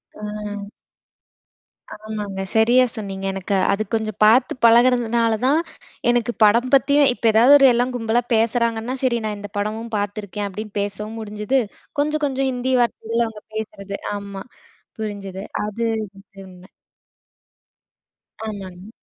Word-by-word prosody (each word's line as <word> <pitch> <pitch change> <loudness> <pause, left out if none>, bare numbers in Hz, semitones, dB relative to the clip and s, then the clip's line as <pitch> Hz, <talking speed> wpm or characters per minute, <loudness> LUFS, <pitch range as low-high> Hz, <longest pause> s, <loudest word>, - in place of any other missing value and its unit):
அ. 210 -1 -6 1.3
ஆமாங்க. 210 -2 -5
சரியா 240 +3 +5
சொன்னீங்க. 195 -3 -5
எனக்கு 195 +1 -2 0.2
அது 205 +2 -1
கொஞ்சம் 215 -2 -1
பாத்து 225 +5 +5
பழகுறதுனால 235 -1 +4
தான் 285 +4 +4 0.5
எனக்கு 240 -1 +2
படம் 235 +4 +4
பத்தியும், 280 +1 +5
இப்போ 240 - -7
எதாவது 240 +6 +7
ஒரு 275 - +5
எல்லா 240 +1 +2
கும்பலா 235 0 0
பேசுறாங்கன்னா, 230 +1 0
சரி 240 -2 +2
நான் 210 -1 -3
இந்த 205 0 -8
படமும் 220 +3 -3
பார்த்துருக்கேன், 205 0 -4
அப்படின்னு 210 +2 -7
பேசவும் 210 +2 -5
முடிஞ்சுது. 210 +4 -1 0.4
கொஞ்ச 300 +1 +1
கொஞ்சம் 270 -1 0
ஹிந்தி 255 +1 -1
வார்த்தைல 230 0 0
அவங்க 220 -1 -10
பேசுறது 200 -2 -5 0.2
ஆமா, 200 -1 -7 0.6
புரிஞ்சுது. 200 -3 -5 0.2
அது 215 +2 -4 0.3
வந்து 195 0 -17
உண்மை. 185 0 -15 1.8
ஆமாங்க. 195 -2 -8
220 Hz, 125 wpm, -21 LUFS, 205-235 Hz, 1.8 s, எதாவது